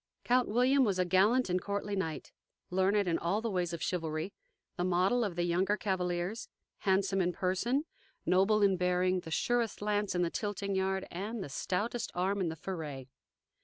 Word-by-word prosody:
Count 250 0 +3
William 255 +5 +4
was 200 -6 +1
a 180 - +2
gallant 205 +8 +3
and 180 0 0
courtly 200 +1 -2
knight, 165 -5 -3 0.4
learned 190 +2 +2
in 165 -1 +1
all 175 +5 0
the 225 0 -2
ways 180 -3 0
of 170 - -4
chivalry, 160 +1 -2 0.4
the 175 - -1
model 185 +7 +2
of 200 -6 -2
the 175 - 0
younger 185 +4 +1
cavaliers, 180 +1 -2 0.3
handsome 195 0 +2
in 180 0 +1
person, 205 - 0 0.4
noble 200 +3 +4
in 195 -2 +4
bearing, 180 +1 +2
the 165 - -9
surest 235 +6 0
lance 205 -1 0
in 175 - +2
the 170 - -1
tilting 205 -1 -2
yard, 190 0 0
and 205 +4 -4
the - - -7
stoutest 210 - -2
arm 190 +3 0
in 175 - 0
the 160 - -4
foray. 155 -6 -5
190 Hz, 180 wpm, -32 LUFS, 180-205 Hz, 0.4 s, William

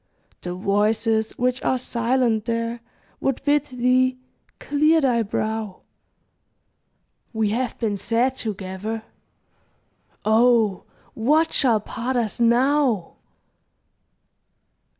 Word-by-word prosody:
The 180 0 -5
voices 220 +3 0
which 250 +1 0
are 260 - +1
silent 235 -2 0
there 230 0 -2 0.4
Would 270 -1 -2
bid 290 0 +2
thee 255 0 +1 0.4
clear 305 +3 +2
thy 250 -5 +2
brow; 215 -1 -3 1.5
We 220 -2 0
have 245 +2 -2
been 215 -4 -1
sad 240 +6 0
together. 210 0 -5 1.2
Oh, 220 -3 +3 0.3
what 305 +8 +2
shall 235 -6 +3
part 240 +5 -4
us 235 -3 -1
now? 240 - +2
235 Hz, 90 wpm, -23 LUFS, 220-255 Hz, 1.5 s, Oh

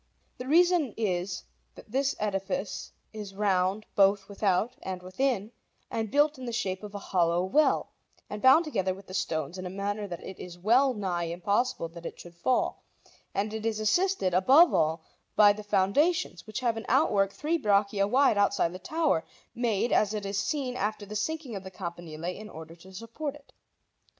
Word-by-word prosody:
The 250 - -6
reason 335 - +3
is 180 -4 -2 0.3
that - - -14
this 275 +2 +1
edifice 195 -1 -3 0.2
is 205 -3 -7
round 195 0 +1
both 195 0 +4
without 205 +3 0
and 185 -1 -5
within 215 +2 -1 0.4
and 220 -1 -2
built 290 +2 +2
in 255 - -6
the 240 - -3
shape 190 -5 -2
of 210 -1 -9
a 200 - -8
hollow 175 -1 +3
well, 295 +11 +2 0.4
and 210 - -6
bound 265 +6 +6
together 190 -10 -1
with 195 0 -13
the 185 - -11
stones 170 -2 -2
in 185 - -6
a - - -5
manner 200 +2 -3
that 175 -3 -7
it 190 - -9
is 175 -1 -8
well 245 +8 +3
nigh 180 -4 -2
impossible 180 +3 -1
that 170 0 -8
it - - -10
should 175 - -11
fall; 210 +9 0 0.5
and 210 +2 -1
it 220 -1 -4
is 225 -1 -1
assisted, 220 - +1
above 270 - +6
all, 160 +1 +1 0.3
by 205 -1 +7
the 210 - -8
foundations, 210 - +1
which 215 +4 -4
have 235 -3 0
an 225 - -5
outwork 195 -1 +3
three 320 +9 -1
braccia 200 -3 +2
wide 250 -2 +3
outside 190 -4 +2
the 185 - -7
tower, 310 - 0 0.3
made, 235 -1 0
as 210 0 +2
it 205 -1 -4
is 195 0 -1
seen, 260 +1 -2
after 210 -2 -2
the 210 +1 -8
sinking 275 +2 -3
of 195 - -6
the 190 - -7
campanile, 170 -3 -7
in 205 +4 -5
order 160 -1 -10
to 185 +3 -15
support 230 +9 -6
it. 290 -1 -18
205 Hz, 185 wpm, -28 LUFS, 185-245 Hz, 0.5 s, by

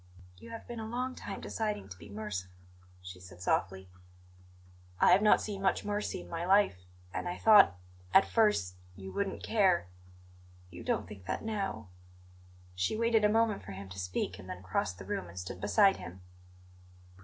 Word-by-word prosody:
"You - - -12
have 230 0 -8
been 240 -1 -6
a 220 - -5
long 250 +3 -2
time 200 -5 -7
deciding 210 - -3
to 90 - -9
be - - -12
merciful," 100 -3 -6 0.5
she 90 0 -9
said 90 -1 -13
softly. 95 +1 -1 1.1
"I - - +6
have 185 +3 +6
not 210 - +5
seen 200 -2 -5
much 190 -1 +1
mercy 205 - -2
in 90 - -12
my 165 - -4
life; 185 - +3 0.3
and - - -3
I 175 - -4
thought 205 - +7 0.3
at 195 - +7
first 210 - +2 0.2
you 95 0 -8
wouldn't 200 -1 -3
care 190 - +2 0.4
" 90 0 -24
"You - - -9
don't - - -1
think 100 -3 -11
that 95 - -2
now." 195 - -3 0.8
She 90 - -1
waited 230 -1 +3
a 210 - +5
moment 220 -1 +2
for 100 - -9
him 95 0 -8
to 95 +1 -8
speak 90 0 -3
and 90 - -11
then 90 0 -7
crossed 90 0 -1
the 95 - -9
room 90 - -3
and 85 +1 -13
stood 90 0 -6
beside 195 - +4
him. 90 +1 -9
105 Hz, 185 wpm, -31 LUFS, -, 1.1 s, thought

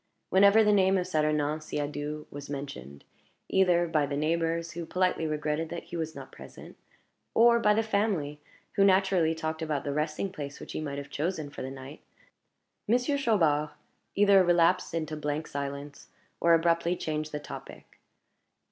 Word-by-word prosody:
Whenever 200 +3 +6
the 210 0 +4
name 190 -1 +4
of 180 - -1
Saturnin 155 -3 0
Siadoux 150 0 -4
was 145 0 -8
mentioned 70 - -7 0.5
either 180 -2 +3
by 155 -3 +1
the 140 0 -3
neighbors, 165 +2 0
who 170 0 -5
politely 180 -1 0
regretted 155 +1 -2
that 170 - -6
he 175 - -9
was 160 -1 -4
not - - -9
present, - - -12 0.6
or 235 +1 +6
by 210 -2 +3
the 225 - +2
family, 200 -9 -1 0.3
who 195 - +3
naturally 190 -4 +3
talked 160 0 -4
about 155 -3 -2
the 140 - -3
resting 155 +5 -2
place 145 -5 -7
which - - -9
he - - -4
might 140 -2 -4
have 140 0 -7
chosen 155 -2 -3
for - - -8
the 130 - -4
night 135 +2 -10 0.9
Monsieur 245 +6 +2
Chaubard 165 - +2 0.5
either 200 -1 +6
relapsed 170 -1 +2
into 155 -1 -3
blank 150 +1 -3
silence, 140 0 -6 0.3
or 170 0 +5
abruptly 170 +1 +1
changed 155 -2 -3
the 150 - -3
topic. 145 - -11
160 Hz, 165 wpm, -28 LUFS, 150-185 Hz, 0.9 s, Whenever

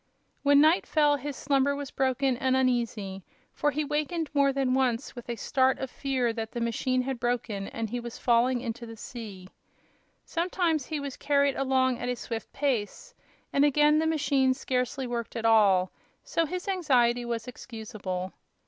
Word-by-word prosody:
When 285 0 +5
night 315 +4 +4
fell 295 -2 +3
his 285 0 -5
slumber 280 0 +1
was 285 -1 -6
broken 265 0 +1
and 260 +1 +1
uneasy, 230 -7 -1 0.3
for 295 - +1
he 295 +2 -1
wakened 300 +2 -2
more 280 -1 +4
than 270 -2 0
once 255 -3 0
with 240 -1 -9
a 235 - -1
start 260 +3 +2
of 265 -1 -5
fear 260 -4 -1
that 225 -1 -5
the 240 - -3
machine 255 +2 0
had 265 -1 -3
broken 235 -5 -2
and 230 -1 -4
he 245 +3 -3
was 235 -1 -7
falling 245 +1 +2
into 235 -1 -5
the 225 0 -10
sea. 210 -7 -8 0.8
Sometimes 335 -4 0
he 310 -2 -3
was 280 -2 -6
carried 280 -1 +2
along 260 -2 +1
at 245 - -3
a 250 - 0
swift 230 -1 -6
pace, 275 - -2 0.4
and 280 - +4
again 295 +1 +4
the 320 - +1
machine 280 -4 +2
scarcely 255 +1 -2
worked 240 -1 -4
at 230 -1 -3
all; 200 -5 +4 0.3
so 330 -1 0
his 365 +5 -5
anxiety 255 -11 +2
was 235 0 -4
excusable. 215 -7 -6
260 Hz, 175 wpm, -28 LUFS, 235-285 Hz, 0.8 s, When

